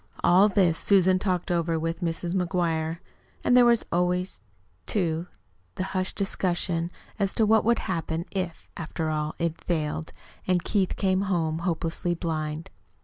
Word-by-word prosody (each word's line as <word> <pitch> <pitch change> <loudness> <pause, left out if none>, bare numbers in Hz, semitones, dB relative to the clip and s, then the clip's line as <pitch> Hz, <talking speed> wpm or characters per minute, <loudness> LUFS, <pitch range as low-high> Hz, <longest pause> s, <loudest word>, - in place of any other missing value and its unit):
All 190 +4 +6
this 180 -5 +3
Susan 185 -2 +4
talked 185 -3 -1
over 170 -1 +1
with 165 +3 -2
Mrs. 170 0 -2
McGuire; 170 -3 0 0.5
and 245 - +4
there 250 -1 +8
was 235 -1 +4
always, 180 - 0 0.5
too, 170 -4 0 0.5
the - - -2
hushed 185 0 -1
discussion 175 -3 0 0.3
as 195 -1 0
to 220 - +3
what 220 +1 +4
would 235 +1 +3
happen 165 -2 -2
if, 180 -4 -4
after 160 -1 -3
all, 150 0 -2
it 165 -1 -2
failed, 155 -2 -2 0.4
and 180 -2 +2
Keith 195 -1 +1
came 190 -1 +1
home 165 -5 0
hopelessly 170 0 -1
blind. 160 0 -3
175 Hz, 145 wpm, -26 LUFS, 165-190 Hz, 0.5 s, there